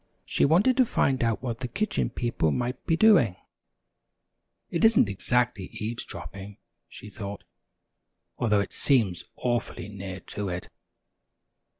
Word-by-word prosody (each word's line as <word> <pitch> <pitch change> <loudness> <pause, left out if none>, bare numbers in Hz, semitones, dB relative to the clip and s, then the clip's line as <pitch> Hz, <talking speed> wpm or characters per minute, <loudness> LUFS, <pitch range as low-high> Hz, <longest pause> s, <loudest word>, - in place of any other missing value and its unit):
She - - +2
wanted 195 - +4
to 260 - +7
find 130 - +1
out 115 +1 0
what 115 -3 -3
the 125 - -3
Kitchen 215 - -1
People 120 -10 0
might 125 - -3
be 165 - +2
doing. 170 - +5 1.4
"It 170 - -1
isn't 225 - +6
exactly 115 +1 0
eavesdropping," 105 -2 -6 0.3
she 105 - -11
thought, 100 -1 -7 1.0
"although 105 -4 +3
it 100 - -5
seems 110 - +1
awfully 120 -3 -2
near 95 -2 -7
to 105 -2 -5
it." 90 0 -5
120 Hz, 125 wpm, -27 LUFS, 100-135 Hz, 1.4 s, to